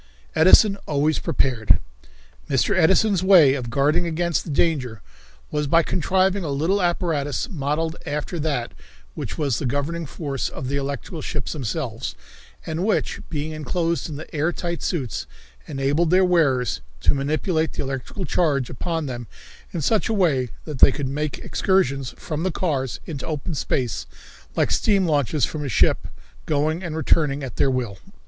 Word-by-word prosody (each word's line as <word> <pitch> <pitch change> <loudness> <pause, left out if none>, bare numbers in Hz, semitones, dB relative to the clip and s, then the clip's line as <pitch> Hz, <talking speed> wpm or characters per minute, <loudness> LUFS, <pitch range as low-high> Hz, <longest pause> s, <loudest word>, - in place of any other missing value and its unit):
Edison 195 +5 +6
Always 150 +1 +1
Prepared. 130 -9 +2 0.7
Mr. 130 -6 +2
Edison's 190 +3 +4
way 180 -8 +7
of 125 -4 -3
guarding 145 +6 +2
against 170 -1 0
the - - -9
danger 140 -7 0 0.5
was 150 -1 0
by 165 +3 +4
contriving 190 +3 +1
a 155 - -3
little 165 +9 +1
apparatus, 170 - 0
modeled 160 +1 -1
after 150 +3 -3
that 140 -6 -1 0.4
which - - -5
was 140 -7 0
the 140 - -1
governing 145 +5 -2
force 140 -2 -3
of 130 - -6
the 140 - -1
electrical 140 - -4
ships 145 -3 -3
themselves, 130 -4 -3 0.5
and 160 +2 -2
which, 215 +1 0
being 155 0 -3
enclosed 165 +2 -1
in 150 - -5
the 155 +2 -9
air 155 +4 +1
tight 170 -1 -4
suits, 135 -10 -2 0.4
enabled 140 +5 +1
their 185 +2 +5
wearers 135 - +2 0.2
to - - +4
manipulate 155 +4 0
the - - -3
electrical 135 +8 -4
charge 140 -6 +1
upon 165 +4 -2
them 120 -3 -5 0.4
in 170 - -3
such 215 +10 +2
a 225 - +1
way 145 - +2 0.2
that 150 -5 -6
they - - +8
could 140 0 -3
make 150 +2 -2
excursions 140 -9 0
from 155 -1 -4
the 185 - +1
cars 145 -8 -1
into 145 -5 -5
open 160 +2 -3
space 120 - -1 0.5
like - - +1
steam 200 -3 +3
launches 145 -2 +2
from 150 -1 -5
a 140 - -3
ship, - - +2 0.4
going 155 +4 +1
and 160 -2 -4
returning 145 -2 +2
at 130 - -6
their 135 - +3
will. 125 -6 -2
150 Hz, 160 wpm, -23 LUFS, 135-170 Hz, 0.7 s, they